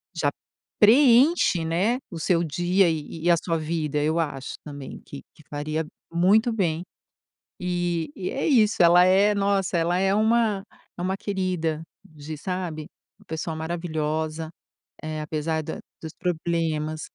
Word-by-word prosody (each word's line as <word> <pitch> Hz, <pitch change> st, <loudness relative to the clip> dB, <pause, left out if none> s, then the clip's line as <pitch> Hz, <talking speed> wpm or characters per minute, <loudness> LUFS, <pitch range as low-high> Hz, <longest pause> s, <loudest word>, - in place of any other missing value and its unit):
Já -, -, +1 dB, 0.5 s
preenche, 240 Hz, -, +5 dB
né, 195 Hz, +10 st, +1 dB
o 165 Hz, -, -6 dB
seu 170 Hz, +1 st, +2 dB
dia 175 Hz, +4 st, +2 dB
e 160 Hz, +1 st, -4 dB
e -, -, +4 dB
a 170 Hz, -, +5 dB
sua 165 Hz, 0 st, -1 dB
vida, 155 Hz, -2 st, -2 dB
eu 160 Hz, +2 st, +1 dB
acho 140 Hz, -4 st, -3 dB
também 145 Hz, -2 st, -8 dB
que 140 Hz, -, -10 dB
que 155 Hz, -, -19 dB
faria 155 Hz, +2 st, -3 dB, 0.3 s
muito 200 Hz, +7 st, +3 dB
bem. 175 Hz, -5 st, 0 dB, 0.8 s
E 175 Hz, -3 st, -1 dB
e 185 Hz, -, -4 dB
é 275 Hz, -, -2 dB
isso, 225 Hz, -, +4 dB
ela 175 Hz, +1 st, +7 dB
é, 200 Hz, +3 st, +4 dB
nossa, 195 Hz, -3 st, +1 dB
ela 170 Hz, +2 st, +1 dB
é 195 Hz, +1 st, +2 dB
uma 220 Hz, -2 st, +2 dB, 0.3 s
é -, -, -5 dB
uma 190 Hz, +2 st, 0 dB
querida 180 Hz, -6 st, -2 dB, 0.2 s
de, 155 Hz, 0 st, -9 dB
sabe, 170 Hz, -3 st, -4 dB, 0.4 s
pessoa 160 Hz, 0 st, -4 dB
maravilhosa, 160 Hz, -1 st, -3 dB, 0.5 s
eh, 155 Hz, 0 st, -4 dB
apesar 155 Hz, +1 st, -2 dB
da -, -, -6 dB, 0.2 s
dos 160 Hz, -1 st, -7 dB
problemas. 160 Hz, -3 st, -2 dB
170 Hz, 145 wpm, -25 LUFS, 155-190 Hz, 0.8 s, ela